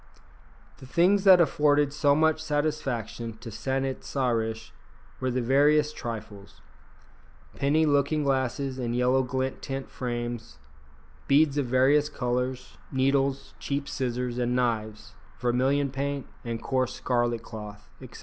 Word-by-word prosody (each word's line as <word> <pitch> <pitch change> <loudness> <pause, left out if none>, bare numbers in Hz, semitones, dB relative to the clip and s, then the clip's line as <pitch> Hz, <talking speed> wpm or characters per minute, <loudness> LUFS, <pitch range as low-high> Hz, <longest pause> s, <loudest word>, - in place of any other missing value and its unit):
The 130 - -11
things 190 +8 +3
that 190 -2 +8
afforded 150 -3 +3
so 145 -1 +3
much 155 0 +2
satisfaction 135 -7 -2
to 115 0 -9
San 135 +5 -2
it 135 -1 -4
sa 130 -3 -1
rish 110 -1 -2 0.5
were 130 - -1
the 125 0 -1
veriest 150 +4 +3
trifles. 105 -3 -7 1.0
Penny 150 +3 +2
looking 145 +1 +2
glasses 135 0 -1
in 120 -1 -2
yellow 125 +2 +3
gilt 130 +1 -3
tin 135 -1 -4
frames, 120 -3 -5 0.7
beads 145 +1 +4
of 135 - -1
various 135 +4 +3
colours, 125 -1 -3
needles, 135 0 0
cheap 140 0 -3
scissors 125 -2 -2
and 125 0 0
knives, 110 -2 -2 0.3
vermilion 130 +3 +1
paint, 140 0 -3 0.2
and 115 -1 -5
coarse 130 -1 0
scarlet 120 -2 0
cloth, 105 -2 -9
etc. - - -11
130 Hz, 130 wpm, -27 LUFS, 120-140 Hz, 1.0 s, that